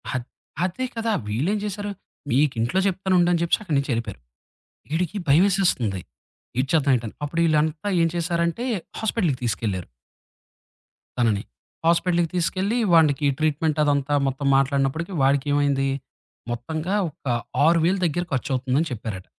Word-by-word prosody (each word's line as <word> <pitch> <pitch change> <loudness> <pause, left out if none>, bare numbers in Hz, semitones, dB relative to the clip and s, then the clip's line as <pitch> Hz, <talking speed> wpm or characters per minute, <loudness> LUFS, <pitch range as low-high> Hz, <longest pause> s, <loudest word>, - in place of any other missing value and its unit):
అద్ 125 -2 -2 0.4
అదే 185 +8 -2
కదా! 225 0 -1 0.2
వీళ్ళేం 140 - 0
జేశారు, 205 0 -4 0.4
మీకింట్లో 130 +2 +1
జెప్తానుండు 185 -2 +2
అని 175 - +2
జెప్పేసి 170 +6 +1
అక్కడి 165 -7 -1
నుంచి 140 0 -1
ఎళ్ళిపోయారు. 115 - -4 0.7
ఈడికి 175 +4 -1
భయమేసేస్తుంది. 155 - +3 0.6
ఏటీచేద్దాం 140 +1 +2
ఏంటని, 115 -2 -7
అప్పుడిళ్ళంతా 155 +2 +1
ఏం 165 - +4
చేశారంటే 170 +4 -1 0.4
హాస్పిటల్‌కి 205 - 0
తీసుకెళ్లారు. 100 -5 -2 1.3
తనని 110 -4 +1 0.4
హాస్పిటలకి 170 0 +2
తీసుకెళ్ళి 190 +6 0 0.2
వాడికి 155 -3 +4
ట్రీట్మెంట్ 155 0 0
అదంతా 145 -1 +1
మొత్తం 135 +1 -2
మాట్లాడినప్పటికి 140 +6 +1
వాడికేమైంది, 140 0 +2 0.6
మొత్తంగా 155 - -3
ఒక 150 -2 -14 0.4
6000 170 +3 +3
దగ్గర 175 +2 0
ఖర్చవుతుందని 130 +3 0
చెప్పారట. 105 -5 -5
155 Hz, 110 wpm, -23 LUFS, 135-175 Hz, 1.3 s, ఏం